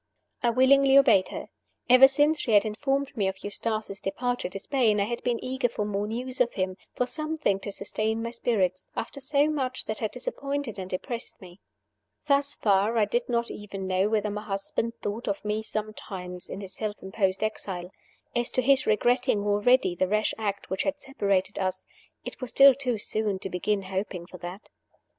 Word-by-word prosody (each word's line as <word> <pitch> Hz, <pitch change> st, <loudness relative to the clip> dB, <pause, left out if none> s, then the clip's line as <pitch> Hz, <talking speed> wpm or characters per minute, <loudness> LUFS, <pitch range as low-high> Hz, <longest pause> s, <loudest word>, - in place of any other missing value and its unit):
I 240 Hz, -, +3 dB
willingly 270 Hz, +3 st, +5 dB
obeyed 260 Hz, -9 st, +6 dB
her. -, -, -7 dB, 0.4 s
Ever 255 Hz, +2 st, +9 dB
since 295 Hz, +3 st, +3 dB
she 235 Hz, -, -1 dB
had 205 Hz, +1 st, +6 dB
informed 275 Hz, +5 st, -1 dB
me 200 Hz, -5 st, +1 dB
of 190 Hz, 0 st, -4 dB
Eustace's 210 Hz, -1 st, -2 dB
departure 245 Hz, +1 st, -2 dB
to 190 Hz, -, -6 dB
Spain 220 Hz, -1 st, +1 dB
I -, -, +3 dB
had 235 Hz, +3 st, -3 dB
been 245 Hz, -1 st, +1 dB
eager 255 Hz, -1 st, 0 dB
for 210 Hz, -2 st, -3 dB
more 205 Hz, 0 st, -2 dB
news 250 Hz, +3 st, -3 dB
of 240 Hz, -1 st, +2 dB
him, 185 Hz, -1 st, -1 dB, 0.2 s
for 250 Hz, -, +1 dB
something 305 Hz, -7 st, 0 dB
to 205 Hz, -, -5 dB
sustain 220 Hz, +3 st, -2 dB
my 230 Hz, -, -3 dB
spirits, 195 Hz, -6 st, 0 dB
after 275 Hz, +4 st, -5 dB
so 280 Hz, +2 st, +2 dB
much 265 Hz, -4 st, -2 dB
that 215 Hz, 0 st, -4 dB
had 220 Hz, -, -1 dB
disappointed 280 Hz, -, -4 dB
and 185 Hz, -1 st, -6 dB
depressed 230 Hz, +6 st, -4 dB
me. 185 Hz, -2 st, -13 dB, 0.7 s
Thus 280 Hz, 0 st, +3 dB
far 205 Hz, +2 st, +2 dB
I 215 Hz, -, +4 dB
did 240 Hz, +4 st, -1 dB
not 235 Hz, -1 st, 0 dB
even 200 Hz, -2 st, -7 dB
know 190 Hz, +2 st, +1 dB
whether 215 Hz, -1 st, 0 dB
my 210 Hz, 0 st, -4 dB
husband 215 Hz, +3 st, -3 dB
thought 210 Hz, +4 st, -3 dB
of 200 Hz, +1 st, -2 dB
me 210 Hz, +1 st, 0 dB
sometimes 195 Hz, -5 st, -6 dB
in 195 Hz, -, -6 dB
his 190 Hz, -1 st, -7 dB
self 215 Hz, 0 st, -4 dB
imposed 190 Hz, 0 st, 0 dB
exile. 190 Hz, -4 st, -3 dB, 0.4 s
As 240 Hz, 0 st, +1 dB
to 255 Hz, -, +3 dB
this 270 Hz, +1 st, +3 dB
regretting 240 Hz, +1 st, +2 dB
already 205 Hz, +1 st, +3 dB
the 185 Hz, +1 st, 0 dB
rash 215 Hz, +2 st, +1 dB
act 200 Hz, -3 st, -3 dB
which 190 Hz, -, 0 dB
had 290 Hz, 0 st, -1 dB
separated 200 Hz, -9 st, -1 dB
us, 185 Hz, -1 st, -2 dB, 0.4 s
it -, -, -7 dB
was 255 Hz, -, -4 dB
still 275 Hz, +2 st, +8 dB
too 250 Hz, -3 st, -1 dB
soon 210 Hz, -1 st, -1 dB
to 190 Hz, 0 st, -6 dB
begin 195 Hz, +3 st, 0 dB
hoping 190 Hz, -2 st, -4 dB
for 180 Hz, 0 st, -12 dB
that. 175 Hz, +4 st, -8 dB
215 Hz, 190 wpm, -27 LUFS, 195-255 Hz, 0.7 s, Ever